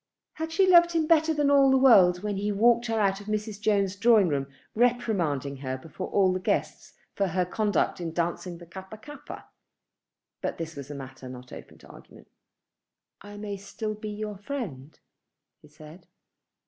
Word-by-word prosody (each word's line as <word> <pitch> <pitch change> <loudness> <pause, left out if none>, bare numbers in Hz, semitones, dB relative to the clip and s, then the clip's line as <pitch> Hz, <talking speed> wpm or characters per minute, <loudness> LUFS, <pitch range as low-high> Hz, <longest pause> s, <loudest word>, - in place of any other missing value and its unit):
Had 320 0 -5
she 380 +4 +3
loved 345 -1 +6
him 325 -2 +1
better 320 0 +3
than 295 -2 +1
all 275 -1 +6
the 265 - +5
world 195 -9 +5
when 205 -2 -2
he 205 +1 -1
walked 235 +3 +3
her 225 -1 0
out 195 -1 +1
of 205 - -13
Mrs. 210 -1 -3
Jones' 200 -3 +1
drawing 210 -3 +4
room, 140 -2 -1 0.3
reprimanding 185 - 0
her 130 -1 -4
before 165 +7 -7
all 190 -2 +2
the 185 - -2
guests 185 - -2 0.2
for 200 - 0
her 180 +1 0
conduct 205 0 0
in 165 -1 -3
dancing 170 +1 -3
the 170 - -13
Kappa 190 +4 -10
kappa? 290 +6 -11 1.0
But - - -3
this 165 0 -6
was 140 -1 -8
a 145 - -6
matter 130 -1 -9
not 125 0 -11
open - - -11
to - - -17
argument. - - -16 0.9
"I 205 0 -11
may 205 -1 -5
still 215 +2 -5
be 215 0 -7
your 210 -1 -6
friend?" 195 - -6 0.6
he - - -17
said. 155 +4 -15
200 Hz, 180 wpm, -27 LUFS, 170-225 Hz, 1.0 s, loved